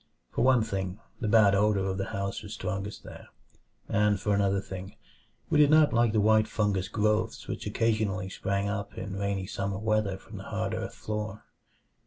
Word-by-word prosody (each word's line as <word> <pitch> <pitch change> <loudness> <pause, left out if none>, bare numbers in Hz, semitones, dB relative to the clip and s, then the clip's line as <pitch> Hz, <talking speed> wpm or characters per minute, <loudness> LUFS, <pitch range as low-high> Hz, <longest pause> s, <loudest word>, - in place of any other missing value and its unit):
For - - -1
one 130 -3 +5
thing, 95 -2 -3 0.2
the 110 - -2
bad 105 -2 +6
odor 100 -1 +2
of 95 0 -2
the 95 - -1
house 100 0 -3
was 105 0 -8
strongest 95 +1 -4
there; - - -11 0.6
and 105 -1 +2
for 105 0 0
another 100 -1 +2
thing, 95 0 -8 0.6
we 150 - +4
did 145 -1 +6
not 155 -1 +5
like 120 -1 +3
the 110 - +2
white 110 +1 +4
fungous 100 -4 0
growths 105 +1 0
which - - -4
occasionally 105 -4 0
sprang 100 +1 -1
up 100 0 -4
in 95 -2 -5
rainy 100 -1 -1
summer 100 +1 -3
weather 110 -2 0
from - - -11
the - - -8
hard - - -2
earth - - -4
floor. 105 0 -4
100 Hz, 185 wpm, -28 LUFS, 100-110 Hz, 0.6 s, bad